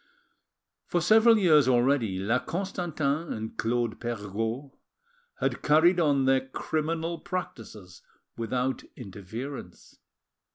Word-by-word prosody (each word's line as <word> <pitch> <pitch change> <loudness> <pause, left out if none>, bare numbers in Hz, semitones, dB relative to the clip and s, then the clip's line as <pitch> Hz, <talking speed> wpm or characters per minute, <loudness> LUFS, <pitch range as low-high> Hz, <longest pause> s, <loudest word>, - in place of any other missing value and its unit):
For 175 - +1
several 225 +5 +5
years 155 -9 +5
already 120 -5 +2
La 110 +7 +1
Constantin 170 -4 -2
and 110 0 -5
Claude 120 -1 -1
Perregaud 115 +3 -4 0.7
had - - -1
carried 165 +4 +4
on 140 -5 +2
their 130 0 +2
criminal 160 +4 -2
practices 110 - -7 0.3
without 125 +3 -2
interference. 110 0 -9
130 Hz, 95 wpm, -27 LUFS, 115-165 Hz, 0.7 s, several